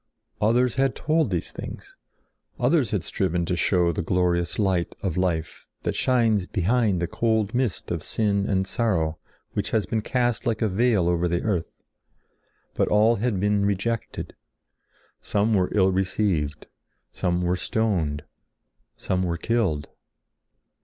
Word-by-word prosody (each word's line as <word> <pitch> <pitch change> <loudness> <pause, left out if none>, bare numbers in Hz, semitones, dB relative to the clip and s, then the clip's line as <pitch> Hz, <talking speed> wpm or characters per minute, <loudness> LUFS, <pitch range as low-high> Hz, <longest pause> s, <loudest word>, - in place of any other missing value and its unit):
Others 120 +3 +3
had 135 -1 +1
told 155 -4 +1
these 90 -3 -2
things; - - -8 0.6
others - - +2
had - - -1
striven 85 +1 -1
to 90 - -1
show 85 0 +2
the 85 - -2
glorious 85 0 0
light 95 -5 0
of 95 - -1
life 85 -4 -2
that - - -1
shines 115 -7 +2
behind 105 0 +1
the 85 - 0
cold 110 +1 0
mist 125 -4 -1
of - - -2
sin 100 -2 0
and 95 -1 +1
sorrow 90 -9 0 0.3
which - - -1
has 110 -2 +1
been 110 - -1
cast 120 +1 0
like 115 0 0
a - - +3
veil 105 -2 +2
over 85 0 +1
the 85 +1 -1
earth; 90 -7 -3 0.9
but - - +1
all 110 +3 +4
had 110 -2 0
been 105 +1 +2
rejected. 100 +3 -2 0.9
Some 105 +2 +1
were 95 -3 +2
ill 95 -2 +3
received; 95 -5 -1 0.5
some 90 -1 -1
were 90 +1 +1
stoned; 90 -9 -1 0.7
some 90 0 -1
were 85 -2 -1
killed. 90 -8 0
100 Hz, 145 wpm, -25 LUFS, 90-110 Hz, 0.9 s, all